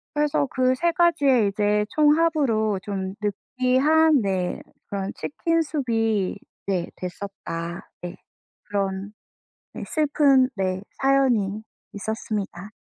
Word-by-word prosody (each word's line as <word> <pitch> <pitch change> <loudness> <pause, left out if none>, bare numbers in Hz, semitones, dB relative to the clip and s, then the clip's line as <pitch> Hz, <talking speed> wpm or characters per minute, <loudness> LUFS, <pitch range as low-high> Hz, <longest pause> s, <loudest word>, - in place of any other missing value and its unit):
그래서 295 -1 +1
그 255 -1 +2
3 340 +5 +1
가지의 280 - +3
이제 210 +1 +1
총합으로 295 - +2
좀 190 -2 -4
느끼한 260 +8 +2
네 185 -3 -1 0.3
그런 195 -1 -3
치킨 330 +2 -1
수프 285 -6 -3
이 220 -4 +1 0.3
네 185 -3 -1
됐었다. 175 -2 -6
네 175 +1 -6 0.5
그런 195 0 -3 0.6
네 - - -6
슬픈 280 -4 +3
네 190 -1 -1 0.2
사연이 245 -7 +2 0.3
있었습니다. 205 -2 -4
220 Hz, 205 characters per minute, -24 LUFS, 195-280 Hz, 0.6 s, 가지의